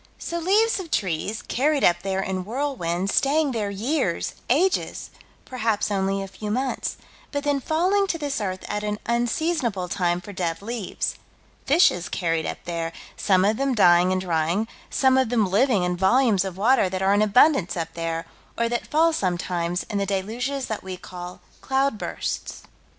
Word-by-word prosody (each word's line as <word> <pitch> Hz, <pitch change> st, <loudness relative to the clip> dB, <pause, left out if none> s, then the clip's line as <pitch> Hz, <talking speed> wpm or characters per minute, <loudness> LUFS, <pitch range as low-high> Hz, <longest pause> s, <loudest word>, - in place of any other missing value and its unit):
So 340 Hz, -, -4 dB
leaves 410 Hz, +6 st, +3 dB
of 360 Hz, -3 st, -7 dB
trees, 195 Hz, -, -1 dB
carried 285 Hz, +3 st, +1 dB
up 175 Hz, -, +5 dB
there 190 Hz, 0 st, -1 dB
in 185 Hz, -1 st, -3 dB
whirlwinds, 200 Hz, -7 st, -2 dB
staying 290 Hz, +1 st, +2 dB
there 215 Hz, -4 st, -2 dB
years, 210 Hz, -, -1 dB, 0.2 s
ages, 355 Hz, +9 st, +1 dB, 0.3 s
perhaps 225 Hz, -5 st, -1 dB
only 195 Hz, 0 st, 0 dB
a -, -, -6 dB
few 210 Hz, +2 st, -7 dB
months, 255 Hz, +5 st, -2 dB, 0.3 s
but 285 Hz, -1 st, -2 dB
then 290 Hz, -1 st, +1 dB
falling 365 Hz, +8 st, +1 dB
to 340 Hz, -, -1 dB
this 290 Hz, -6 st, -2 dB
earth 185 Hz, -2 st, -3 dB
at 210 Hz, 0 st, -2 dB
an 210 Hz, 0 st, -2 dB
unseasonable 235 Hz, -, 0 dB
time 175 Hz, -2 st, 0 dB
for 205 Hz, +3 st, -10 dB
dead 170 Hz, -1 st, -3 dB
leaves 230 Hz, -2 st, -3 dB, 0.5 s
fishes 275 Hz, -, +4 dB
carried 165 Hz, -2 st, -1 dB
up -, -, -4 dB
there, 165 Hz, -1 st, -3 dB, 0.2 s
some 190 Hz, -2 st, +3 dB
of 215 Hz, +2 st, +2 dB
them 275 Hz, -1 st, 0 dB
dying 180 Hz, -3 st, +5 dB
and 185 Hz, 0 st, 0 dB
drying, 175 Hz, +4 st, 0 dB, 0.2 s
some 265 Hz, -1 st, +3 dB
of 260 Hz, -4 st, +1 dB
them 230 Hz, -3 st, +2 dB
living 210 Hz, +1 st, +2 dB
in 180 Hz, 0 st, 0 dB
volumes 200 Hz, +2 st, +3 dB
of 190 Hz, -2 st, -6 dB
water 220 Hz, -1 st, +3 dB
that 190 Hz, +1 st, -3 dB
are 195 Hz, +1 st, +4 dB
in 205 Hz, -, +3 dB
abundance 215 Hz, -, +4 dB
up 165 Hz, -1 st, -3 dB
there, 165 Hz, 0 st, -3 dB, 0.3 s
or 235 Hz, -, +1 dB
that 240 Hz, 0 st, -2 dB
fall 325 Hz, +2 st, +3 dB
sometimes 175 Hz, -, -1 dB
in 205 Hz, -, -3 dB
the 200 Hz, -, -1 dB
deluges 240 Hz, +8 st, -2 dB
that 220 Hz, -, -4 dB
we 185 Hz, -1 st, -6 dB
call 180 Hz, 0 st, -9 dB, 0.2 s
"cloudbursts." 270 Hz, -4 st, -2 dB
210 Hz, 170 wpm, -24 LUFS, 185-270 Hz, 0.5 s, up